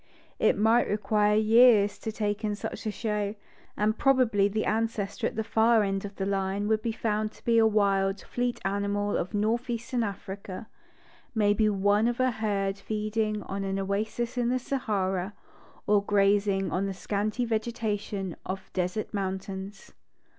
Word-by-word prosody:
It - - +3
might 225 +3 +3
require 210 0 +2
years 220 -1 +5
to 220 - -4
take 210 0 -2
in 210 -1 0
such 210 - -6
a - - 0
show, 210 -1 -2 0.4
and 215 +1 +1
probably 250 -7 +3
the 215 +2 -1
ancestor 225 0 -1
at - - -6
the 220 - -1
far 225 0 +3
end 195 0 -2
of 200 0 -8
the 195 - -2
line 195 +1 -1
would 220 0 +2
be 230 - -1
found 215 -1 -1
to - - -20
be 230 -1 +4
a 225 - +6
wild, 195 -2 +2
fleet 245 +2 -2
animal 200 +1 0
of 185 +5 -2
north 225 +4 0
eastern 240 +1 -2
Africa, 200 -1 -5 0.3
— - - -30 0.3
maybe 215 0 +3
one 205 +2 +2
of 240 +1 -1
a 255 0 +3
herd 200 -3 -1
feeding 215 0 -2
on 195 +1 -4
an 195 0 -2
oasis 215 +5 -2
in 240 -1 +1
the 255 - +2
Sahara, 200 -7 -2 0.5
or 205 -1 +3
grazing 200 -1 +2
on 195 +2 0
the 195 - -4
scanty 210 +5 -1
Vegeta 220 -2 -1
tion 195 -4 -5
of 190 0 -6
desert 185 +5 -2
mountains. 195 0 -5
210 Hz, 170 wpm, -28 LUFS, 200-220 Hz, 0.5 s, a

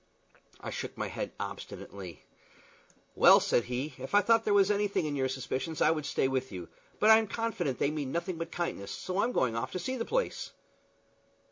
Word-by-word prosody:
I - - -6
shook - - -5
my - - -2
head - - -4
obstinately. 95 -4 -7 0.9
"Well," - - +8
said 120 - +1
he, 130 +4 -3
"if 135 +9 -3
I 205 - +7
thought 230 +1 +3
there 210 - +1
was 200 0 +5
anything 205 -4 +1
in 145 -1 -2
your 130 -1 0
suspicions 130 +4 -3
I 155 - +5
would 155 -3 -2
stay 155 - +1
by 130 -1 +1
you; 90 -4 -7 0.3
but 215 - +6
I'm 220 0 +6
confident 195 - -2
they 140 - +1
mean 145 -4 -3
nothing 170 +1 -3
but 165 - -4
kindness, 135 - -3
so 185 - -2
I'm 245 - +1
going 125 - +1
off 115 - -2
to 185 - -2
see 260 +9 -3
the 230 - -1
place." - - -2
160 Hz, 200 wpm, -30 LUFS, 130-205 Hz, 0.9 s, Well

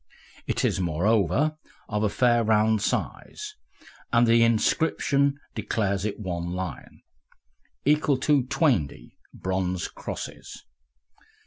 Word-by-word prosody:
It - - 0
is, - - +1
moreover, 100 - +1 0.3
of 105 -1 -2
a 105 - +2
fair 120 +2 +3
round 110 -1 +3
size, 425 - -3 0.6
and 120 0 +5
the 115 0 +5
inscription 140 +4 +2 0.2
declares 100 -3 -1
it 105 0 -3
one 85 -3 -4
Lion, 90 -2 -6 0.8
equal 150 -2 +3
to 145 -4 +3
"twaindy" 95 - 0 0.2
bronze 95 -1 -2
Crosses. - - -8
110 Hz, 105 wpm, -26 LUFS, 95-130 Hz, 0.8 s, and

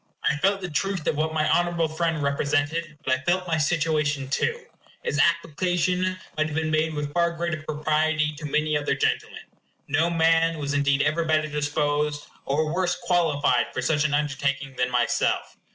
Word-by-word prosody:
I - - +3
felt 195 +5 +1
the 180 - -3
truth 190 +1 -1
of - - +1
what 155 +2 0
my 155 -1 +1
honorable 175 -1 +2
friend 160 -1 -1
represented; 145 +3 -1
but 130 - +2
I 130 - -1
felt 180 +5 0
my 160 -2 0
situation 150 -3 0
too. 470 - -1 0.4
His 145 - -1
application 180 +3 +1 0.2
might 155 0 +1
have 150 - -6
been 160 0 -1
made 155 0 +1
with 145 -1 -4
far 170 0 +2
greater 170 -2 -3
propriety 155 0 0
to 150 - -7
many 150 +1 0
other 145 0 0
gentlemen. - - -1 0.4
No 160 +4 +2
man 165 0 +3
was 145 -1 -3
indeed 140 0 +2
ever 155 +2 +1
better 155 -1 +1
disposed, 145 0 -1 0.2
or 155 +3 0
worse 180 0 +1
qualified, 150 -8 +2
for 130 - -2
such 150 +3 +2
an 150 -1 +1
undertaking 140 -2 -1
than 125 0 0
myself. 120 -1 0
155 Hz, 175 wpm, -25 LUFS, 145-165 Hz, 0.4 s, I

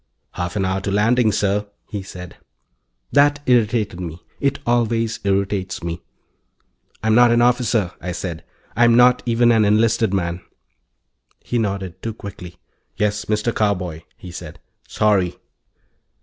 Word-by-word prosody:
"Half 90 +1 -4
an 95 -2 0
hour 95 +1 -1
to 100 - -3
landing, 110 +3 +3
sir," 105 +1 0 0.2
he 105 -3 -5
said. 90 -2 -10 0.7
That 145 +1 +4
irritated 110 -6 +1
me. 85 -2 -6 0.2
It 140 0 0
always 115 -1 +1
irritates 100 -2 -1
me. 85 0 -4 1.0
"I'm 110 0 +2
not 120 +1 +6
an 120 0 +4
officer," 120 -6 +2
I 90 - -4
said. 85 -2 -5 0.3
"I'm 120 -1 +5
not 125 0 +5
even 120 0 +4
an 110 -2 +4
enlisted 110 +1 +2
man." 85 -2 -2 1.0
He 120 - -1
nodded, 100 -5 -3
too 115 -1 -4
quickly. 90 -4 -10 0.4
"Yes, 105 -1 0
Mr. 110 +2 0
Carboy," 90 -6 -1 0.2
he 90 - -10
said. 85 - -9 0.3
"Sorry." 100 -5 +1
105 Hz, 135 wpm, -20 LUFS, 95-115 Hz, 1.0 s, not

